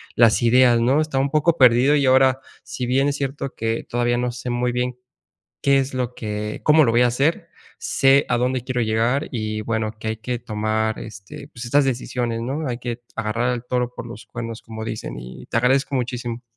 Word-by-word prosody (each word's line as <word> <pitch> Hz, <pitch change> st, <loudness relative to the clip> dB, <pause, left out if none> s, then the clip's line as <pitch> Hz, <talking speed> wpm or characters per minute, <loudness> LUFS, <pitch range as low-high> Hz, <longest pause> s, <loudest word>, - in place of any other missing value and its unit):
las 115 Hz, -2 st, +5 dB
ideas, 120 Hz, 0 st, +5 dB
¿no?, 135 Hz, +6 st, +3 dB
estaba 135 Hz, -4 st, 0 dB
un 140 Hz, -, -2 dB
poco 160 Hz, +2 st, +2 dB
perdido 125 Hz, +2 st, +5 dB
y 140 Hz, -2 st, +2 dB
ahora, 130 Hz, 0 st, +4 dB, 0.2 s
si 125 Hz, -, -5 dB
bien 135 Hz, +2 st, +2 dB
es 140 Hz, -, -2 dB
cierto 140 Hz, 0 st, -4 dB
que 115 Hz, 0 st, -2 dB
todavía 120 Hz, 0 st, 0 dB
no 125 Hz, 0 st, -1 dB
sé 125 Hz, +1 st, -6 dB
muy 120 Hz, 0 st, 0 dB
bien, 125 Hz, 0 st, -2 dB, 0.7 s
qué 140 Hz, 0 st, +4 dB
es 135 Hz, 0 st, -1 dB
lo 125 Hz, -1 st, -2 dB
que 105 Hz, -1 st, -4 dB
cómo 155 Hz, 0 st, +6 dB
lo 115 Hz, -, +2 dB
voy 120 Hz, +1 st, +4 dB
a 125 Hz, -, +4 dB
hacer, 140 Hz, +7 st, 0 dB, 0.3 s
sé 135 Hz, +1 st, +3 dB
a 120 Hz, -, +2 dB
dónde 125 Hz, 0 st, 0 dB
quiero 125 Hz, -1 st, -2 dB
llegar 115 Hz, +5 st, 0 dB
y 110 Hz, -3 st, -3 dB
bueno, 110 Hz, -1 st, -2 dB
que 110 Hz, -, -5 dB
hay 110 Hz, -, -2 dB
que 120 Hz, +2 st, -3 dB
tomar, 110 Hz, -1 st, -1 dB
este, 105 Hz, +6 st, -10 dB
pues 120 Hz, -4 st, -9 dB
estas 140 Hz, +4 st, +3 dB
decisiones, 120 Hz, -2 st, -2 dB
¿no?, 140 Hz, +6 st, -3 dB
"Hay 120 Hz, -1 st, -3 dB
que 120 Hz, -1 st, -5 dB
agarrar 115 Hz, +3 st, 0 dB
el 120 Hz, 0 st, -6 dB
toro 125 Hz, -1 st, -1 dB
por -, -, -7 dB
los 115 Hz, -2 st, -10 dB
cuernos", 115 Hz, -1 st, -7 dB
como 110 Hz, -1 st, -7 dB
dicen. 110 Hz, -, -5 dB
Y -, -, -10 dB
te -, -, -3 dB
agradezco 135 Hz, +3 st, +2 dB
muchísimo. 120 Hz, -1 st, -3 dB
120 Hz, 210 wpm, -22 LUFS, 115-130 Hz, 0.7 s, cómo